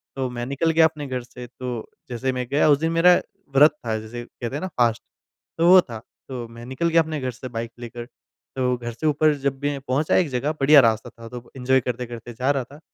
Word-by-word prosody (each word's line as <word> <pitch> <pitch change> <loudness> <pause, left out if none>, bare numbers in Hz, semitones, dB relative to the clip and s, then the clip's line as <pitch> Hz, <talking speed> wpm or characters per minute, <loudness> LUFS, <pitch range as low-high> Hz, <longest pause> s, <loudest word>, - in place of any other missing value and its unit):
तो 130 -2 -2
मैं 120 -1 -5
निकल 140 +5 0
गया 160 0 +5
अपने 150 -3 -2
घर 130 -1 -3
से। 125 0 -10
तो 125 -2 -6 0.2
जैसे 125 +2 -2
मैं 125 -1 -3
गया 150 +1 +4
उस 145 - +6
दिन 165 +1 0
मेरा 170 +2 +6 0.4
व्रत 150 +3 +7
था 110 -1 -1
जैसे 120 +2 -7
कहते 120 +3 -7
हैं 150 - -3
ना 185 - -2
फ़ास्ट 120 -1 +2 0.6
तो 165 +1 +3
वो 185 0 +9
था। 115 -7 -8 0.3
तो 120 -3 -5
मैं 115 +1 -11
निकल 130 +7 -1
गया 165 0 +5
अपने 155 -1 -4
घर 130 -1 -2
से 130 +2 -9
बाइक 115 0 -5
लेकर 120 0 -7 0.5
तो 125 -1 +1
घर 120 0 -5
से 155 +7 -3
ऊपर 150 +1 +3
जब 135 -1 -2
भी 145 0 -1
पहुँचा 135 +3 0
एक 175 -5 +3
जगह, 135 +4 -1
बढ़िया 150 -1 +6
रास्ता 110 -2 +1
था 115 0 -12
तो 125 -1 -10
एंजॉय 130 +1 +2
करते-करते 120 -1 -5
जा 130 +5 0
रहा 135 -3 -1
था। 145 +4 -15
130 Hz, 235 wpm, -23 LUFS, 120-150 Hz, 0.6 s, वो